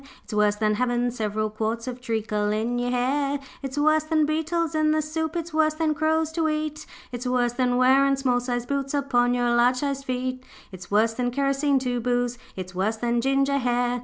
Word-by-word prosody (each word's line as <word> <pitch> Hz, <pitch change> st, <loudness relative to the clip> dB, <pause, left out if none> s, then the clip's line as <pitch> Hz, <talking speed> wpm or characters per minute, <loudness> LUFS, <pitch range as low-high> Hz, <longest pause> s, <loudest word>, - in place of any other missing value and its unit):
It's -, -, -10 dB
worse 210 Hz, 0 st, +3 dB
than 215 Hz, 0 st, +1 dB
havin' 245 Hz, 0 st, +1 dB
several 215 Hz, -2 st, -2 dB
quarts 225 Hz, +2 st, -3 dB
Of 250 Hz, 0 st, -5 dB
treacle 220 Hz, -3 st, -1 dB
in 230 Hz, +3 st, -1 dB
your 245 Hz, 0 st, -1 dB
hair. 275 Hz, +3 st, 0 dB, 0.2 s
'It's 270 Hz, 0 st, -6 dB
worse 310 Hz, +1 st, +3 dB
than 310 Hz, -1 st, +2 dB
beetles 320 Hz, +2 st, -1 dB
in 310 Hz, 0 st, +2 dB
the 310 Hz, 0 st, +2 dB
soup, 320 Hz, +2 st, -3 dB
It's 335 Hz, -1 st, -4 dB
worse 310 Hz, 0 st, +2 dB
than 310 Hz, -1 st, +1 dB
crows 315 Hz, +1 st, +1 dB
to 320 Hz, -1 st, 0 dB
eat. 305 Hz, 0 st, -3 dB, 0.2 s
It's 245 Hz, 0 st, -5 dB
worse 245 Hz, -1 st, +1 dB
than 245 Hz, 0 st, +1 dB
wearin' 270 Hz, +2 st, +4 dB
small 255 Hz, -2 st, +1 dB
sized 245 Hz, -1 st, -3 dB
boots 275 Hz, +1 st, -2 dB
Upon 245 Hz, -3 st, +2 dB
your 245 Hz, -1 st, +1 dB
large 240 Hz, +1 st, +4 dB
sized 275 Hz, +1 st, -3 dB
feet. 255 Hz, 0 st, -3 dB, 0.3 s
'It's 185 Hz, -1 st, -10 dB
worse 220 Hz, +2 st, +3 dB
than 245 Hz, +1 st, -1 dB
kerosene 275 Hz, +2 st, +1 dB
to 245 Hz, -1 st, -1 dB
boose, 245 Hz, 0 st, -1 dB, 0.2 s
It's 185 Hz, -1 st, -7 dB
worse 200 Hz, +5 st, -1 dB
than 235 Hz, +1 st, 0 dB
ginger 275 Hz, +2 st, +2 dB
hair. 245 Hz, -1 st, 0 dB
250 Hz, 200 wpm, -25 LUFS, 240-290 Hz, 0.3 s, wearin